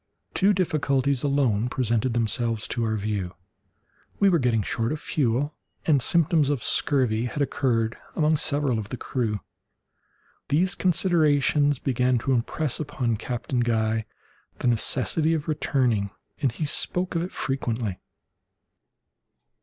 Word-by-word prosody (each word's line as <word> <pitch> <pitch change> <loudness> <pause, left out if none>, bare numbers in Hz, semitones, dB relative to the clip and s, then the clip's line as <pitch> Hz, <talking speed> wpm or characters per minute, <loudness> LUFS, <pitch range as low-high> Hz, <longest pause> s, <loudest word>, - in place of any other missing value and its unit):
Two 200 +2 +4
difficulties 140 -7 +1
alone 130 -6 +1
presented 120 -1 0
themselves 115 -1 0
to 120 - -1
our 110 -1 0
view; 100 -3 -3 0.8
we 200 - +5
were 170 -3 +3
getting 115 -4 +1
short 115 +3 -1
of 155 - -2
fuel, 140 +1 0 0.3
and 145 -4 +3
symptoms 160 -1 +3
of 140 -6 -1
scurvy 125 -5 +1
had 125 - -4
occurred 120 -5 0 0.2
among 155 0 +3
several 145 -5 +1
of 105 -1 -6
the 125 - -4
crew. 110 -6 -2 1.1
These 175 +7 +2
considerations 150 -6 +2
began 125 -1 +1
to 125 +4 -1
impress 130 +3 -1
upon 135 -7 -1
Captain 120 +2 -3
Guy 110 -2 +1 0.5
the - - -2
necessity 130 +7 +1
of 150 - -4
returning, 125 -9 +1 0.3
and 135 - +2
he 155 +7 -3
spoke 180 +5 -1
of 165 - 0
it 180 - -4
frequently. 115 -7 -2
130 Hz, 130 wpm, -25 LUFS, 115-150 Hz, 1.1 s, we